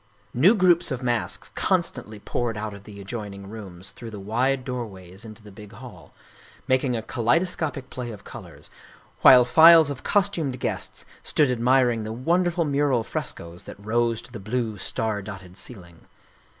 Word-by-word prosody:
New 175 - +5
groups 175 -4 +3
of 130 -3 -4
masks 120 -2 -2
constantly 110 0 -1
poured 115 +2 -3
out 105 0 -4
of 100 0 -12
the 105 -1 -11
ad 100 - -10
joining 100 -3 -6
rooms 95 -4 -9
through 115 - -10
the 105 -2 -8
wide 125 +6 0
doorways 100 -6 -7
into 110 0 -12
the 105 - -13
big 105 +1 -13
hall, 100 - -12 0.6
making 130 -1 +2
a 110 - -5
kaleidoscopic 135 +3 -1
play 125 -2 -5
of 105 -3 -9
colors, - - -12 0.5
while 125 -2 +8
files 160 +2 +7
of 130 - -7
cos 200 -1 +2
tumed 155 -10 -3
guests - - -4 0.2
stood 145 -4 +2
admiring 125 -1 +2
the 110 - -5
wonderful 170 +6 +1
mural 140 -4 +1
frescoes 85 -4 -6
that - - -10
rose 115 +2 0
to 120 - -15
the 115 - -7
blue, 110 +2 -2
star 110 +1 -2
dotted 95 -3 -10
ceiling. 85 -6 -9
120 Hz, 165 wpm, -24 LUFS, 105-130 Hz, 0.6 s, while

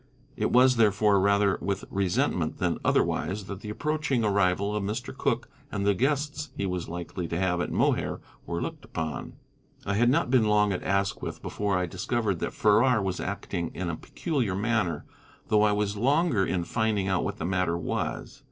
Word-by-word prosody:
It - - 0
was, 125 0 +5
therefore, 105 -2 +4
rather 100 0 +3
with 100 0 -2
resentment 95 -2 0
than - - 0
otherwise 95 +3 +1
that 100 -1 -6
the 105 - -8
approaching 145 0 -1
arrival 100 0 +2
of 105 - -1
Mr. 115 +6 -4
Cooke 125 -3 -1 0.2
and 100 -1 -2
the 100 - +4
guests 145 +6 -1
he 100 - -1
was 90 -3 -3
likely 85 +1 -5
to 85 - -3
have 90 -1 +1
at - - -3
Mohair - - +1 0.3
were 85 0 -2
looked - - -6
upon. 80 -5 -5 0.5
I 100 - 0
had 120 +4 +3
not 125 -1 +2
been 125 -4 +4
long 105 -1 +3
at 90 - -3
Asquith 100 +1 -1
before 100 -2 -1
I 90 - 0
discovered 100 +1 -1
that - - -2
Farrar 110 +3 +4
was 95 -3 -2
acting 90 -3 -3
in 90 -1 -2
a - - -3
peculiar 125 - -2
manner, 105 -4 0 0.4
though 105 -1 +4
I 105 0 +4
was 105 0 0
longer 135 - +2
in 90 -2 0
finding 105 +1 0
out 95 -2 +1
what - - -3
the 80 - -4
matter 90 -2 0
was. 85 - -3
100 Hz, 185 wpm, -27 LUFS, 95-115 Hz, 0.5 s, was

